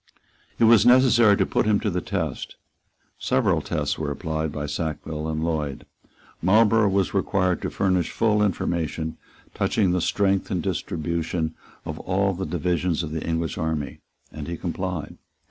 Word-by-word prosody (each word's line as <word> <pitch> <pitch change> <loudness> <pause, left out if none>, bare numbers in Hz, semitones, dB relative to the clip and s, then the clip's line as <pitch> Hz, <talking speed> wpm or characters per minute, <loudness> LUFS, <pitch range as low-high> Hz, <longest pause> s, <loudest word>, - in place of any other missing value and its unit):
It - - +2
was 115 -2 +7
necessary 120 -4 +6
to - - +2
put - - 0
him 105 -2 +3
to 105 - 0
the 90 0 -1
test. 80 -9 -4 0.6
Several - - +1
tests 75 -1 -2
were 75 -2 -2
applied 80 +1 -3
by 75 0 -4
Sackville 75 +1 -4
and 80 0 -2
Lloyd. 75 -4 -2 0.6
Marlborough 105 +3 +4
was 95 -1 +1
required 95 -2 +1
to - - -2
furnish 95 -2 +1
full 105 -2 +1
information 80 -5 -1 0.4
touching 100 -5 +1
the 90 0 +1
strength 100 +1 +1
and 90 -3 -1
the 95 - 0
distribution 85 -1 -2 0.3
of 80 0 -5
all 100 +1 0
the 95 0 -4
divisions 85 +1 0
of 80 - -5
the 80 -1 -3
English 80 0 -2
army; 80 -3 -3 0.3
and 75 - -7
he 85 0 -4
complied. 90 -2 -4
85 Hz, 160 wpm, -24 LUFS, 80-100 Hz, 0.6 s, was